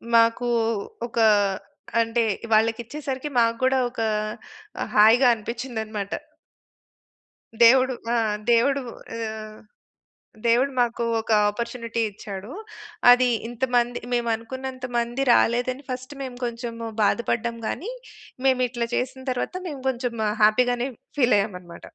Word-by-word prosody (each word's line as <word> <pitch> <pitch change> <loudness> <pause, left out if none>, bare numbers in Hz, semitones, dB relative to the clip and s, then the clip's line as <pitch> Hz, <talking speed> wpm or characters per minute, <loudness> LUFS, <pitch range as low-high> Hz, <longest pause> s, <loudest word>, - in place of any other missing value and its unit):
మాకు 230 +1 +4 0.6
ఒక 235 - -11 0.8
అంటే, 230 +1 +2 0.3
వాళ్ళకిచ్చేసరికి 250 +6 0
మాకు 230 0 +2
గూడా 260 +1 +3
ఒక 230 - -6 0.8
ఆహ్, - - -3
హాయిగా 225 +5 +7
అనిపించిందన్నమాట. 220 -3 -5 1.5
దేవుడు, 255 +2 +6 0.2
ఆ! - - +2 0.4
దేవుడు 275 +4 +3 0.4
ఆహ్, 220 -1 -6 0.9
దేవుడు 245 +4 +3
మాకు 235 -1 0 0.2
ఒక 225 - -8 0.2
అపార్చునిటీ 230 +1 -4
ఇచ్చాడు. 200 +1 -8 0.6
అది 250 +1 +6 0.2
ఇంతమంది 240 0 0
మేమనుకున్నంత 245 +2 -2
మంది 240 +3 -1
రాలేదని 250 +4 +2
ఫస్ట్ 255 +3 -6
మేం 255 -2 -6
కొంచెం 235 0 -4 0.3
బాధపడ్డం 230 +2 0
గానీ, 420 - -3 0.6
మేమిట్ల 250 -2 +1
జేసిన 260 +1 -3
తరువాత 250 +8 -3
మేము 285 -3 -6
కొంచెం 245 -1 -3 0.3
హ్యాపీగానే 245 +3 +3 0.3
ఫీల్ 250 -4 +4
అయ్యామన్నమాట. 180 -4 -5
240 Hz, 100 wpm, -24 LUFS, 230-255 Hz, 1.5 s, హాయిగా